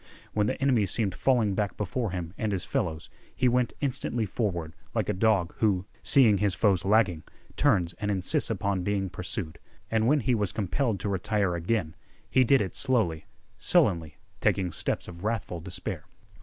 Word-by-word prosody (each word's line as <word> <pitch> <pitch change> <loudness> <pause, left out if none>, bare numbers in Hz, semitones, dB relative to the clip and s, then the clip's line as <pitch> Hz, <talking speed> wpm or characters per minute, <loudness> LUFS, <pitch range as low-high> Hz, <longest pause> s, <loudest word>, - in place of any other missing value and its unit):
When 105 -1 +1
the - - -2
enemy 125 -7 +2
seemed 100 0 +1
falling 115 -5 +2
back 100 -1 -2
before 110 +3 -2
him 90 -2 -5
and 110 -1 -2
his 95 -3 -2
fellows, 80 -2 -2 0.3
he 130 - +2
went 125 0 +2
instantly 130 -4 -1
forward, 90 -6 -2 0.2
like - - 0
a - - +2
dog 95 -3 +2
who, 95 -4 +2 0.2
seeing 115 -8 +5
his 100 -3 +1
foes 95 -5 +2
lagging, 100 -5 +3 0.3
turns 85 -1 +2
and 105 -1 -2
insists 95 -3 +1
upon 100 -2 -1
being 95 -1 -1
pursued. 90 -2 -4 0.3
And 110 0 +2
when 145 +2 +4
he 125 +2 +1
was 105 -5 0
compelled 110 +1 -1
to 100 - -2
retire 100 -1 0
again, 85 -1 -1 0.3
he 130 - +4
did 130 -1 +4
it 95 - -5
slowly, 110 - 0 0.3
sullenly, 80 -3 +2 0.2
taking 90 -3 +1
steps 75 - -2
of 85 0 -10
wrathful 105 -5 -2
despair. 90 0 -5
100 Hz, 170 wpm, -28 LUFS, 90-115 Hz, 0.3 s, seeing